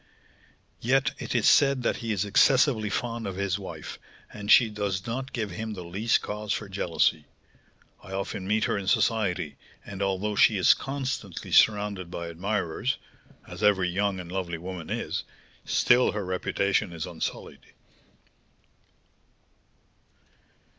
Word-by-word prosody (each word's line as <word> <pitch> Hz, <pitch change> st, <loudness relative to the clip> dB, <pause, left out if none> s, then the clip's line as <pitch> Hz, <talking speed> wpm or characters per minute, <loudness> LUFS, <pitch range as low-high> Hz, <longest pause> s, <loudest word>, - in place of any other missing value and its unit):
"Yet 130 Hz, +2 st, +2 dB
it -, -, -4 dB
is -, -, +3 dB
said 135 Hz, -3 st, +4 dB
that -, -, 0 dB
he 115 Hz, -1 st, -4 dB
is 105 Hz, -1 st, 0 dB
excessively 115 Hz, +1 st, +4 dB
fond 115 Hz, +1 st, -3 dB
of 95 Hz, -, -4 dB
his 100 Hz, 0 st, -1 dB
wife, 95 Hz, -, -8 dB, 0.3 s
and 105 Hz, -1 st, -7 dB
she 120 Hz, -, +8 dB
does 100 Hz, -3 st, -3 dB
not 130 Hz, +3 st, -4 dB
give 110 Hz, -5 st, -3 dB
him 110 Hz, +4 st, -5 dB
the 90 Hz, -3 st, -7 dB
least 100 Hz, +7 st, 0 dB
cause 105 Hz, 0 st, -4 dB
for 105 Hz, -, -2 dB
jealousy. 85 Hz, -5 st, 0 dB, 0.8 s
I 100 Hz, -, -11 dB
often 95 Hz, 0 st, -4 dB
meet 110 Hz, +2 st, +1 dB
her -, -, +1 dB
in 95 Hz, -, -7 dB
society, 95 Hz, -8 st, +1 dB, 0.3 s
and, 100 Hz, -1 st, -7 dB
although 100 Hz, +2 st, -1 dB
she 110 Hz, 0 st, +5 dB
is 95 Hz, -, +6 dB
constantly 135 Hz, -9 st, -5 dB
surrounded 105 Hz, -4 st, +3 dB
by 85 Hz, -1 st, -5 dB
admirers 100 Hz, +6 st, -2 dB, 0.5 s
(as -, -, -9 dB
every 95 Hz, -3 st, +3 dB
young 100 Hz, +1 st, 0 dB
and 90 Hz, -1 st, -8 dB
lovely 90 Hz, -3 st, -3 dB
woman 90 Hz, -1 st, -7 dB
is), -, -, -3 dB, 0.4 s
still 125 Hz, +1 st, +3 dB
her 105 Hz, -2 st, -3 dB
reputation 95 Hz, +1 st, 0 dB
is 80 Hz, -2 st, -4 dB
unsullied." 85 Hz, -3 st, -6 dB
100 Hz, 140 wpm, -27 LUFS, 95-110 Hz, 0.8 s, she